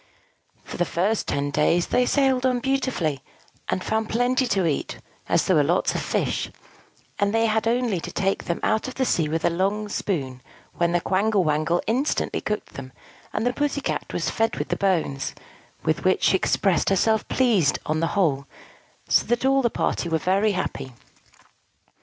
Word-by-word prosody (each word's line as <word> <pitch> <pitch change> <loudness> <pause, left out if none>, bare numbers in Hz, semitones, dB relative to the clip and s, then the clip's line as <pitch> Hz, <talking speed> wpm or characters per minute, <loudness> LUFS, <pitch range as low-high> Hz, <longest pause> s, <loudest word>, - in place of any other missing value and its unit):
For - - -8
the 175 - +2
first 190 +6 -1
ten 140 0 -1
days 160 +4 +2
they 250 0 +1
sailed 265 -3 +2
on 255 -1 +2
beautifully, 250 - -1 0.5
and 185 - -1
found 220 0 -1
plenty 250 +2 +1
to 195 -5 +1
eat, 150 -4 -2 0.3
as - - +2
there - - +3
were - - +4
lots - - +1
of - - -2
fish; - - -1 0.7
and 200 0 +2
they 225 0 +3
had 220 0 +1
only 235 -5 +1
to 155 - -7
take 195 0 -1
them 170 - -2
out 220 - +1
of 255 - -7
the 260 - 0
sea 160 -9 +1
with 160 +1 -1
a - - +3
long 200 +4 -1
spoon, 135 -12 -3 0.3
when 170 0 0
the 175 0 +1
Quangle 200 +2 +1
Wangle 155 +2 +1
instantly 255 +7 0
cooked 210 0 -4
them; 130 -1 -8 0.4
and 220 - -2
the 245 - +1
Pussy 290 +1 -1
Cat - - -3
was - - -1
fed 225 0 0
with - - -3
the - - 0
bones, 170 -8 -1 0.5
with - - 0
which - - +2
she - - +4
expressed - - +1
herself 215 +3 +2
pleased, 220 - +2
on 155 +1 0
the 165 - +1
whole: 140 -7 +1 0.6
so - - +3
that 240 +2 0
all 270 0 +4
the 240 - +2
party 170 - -1
were 165 - +2
very 195 +5 +1
happy. 135 -8 -4
200 Hz, 185 wpm, -24 LUFS, 165-240 Hz, 0.7 s, were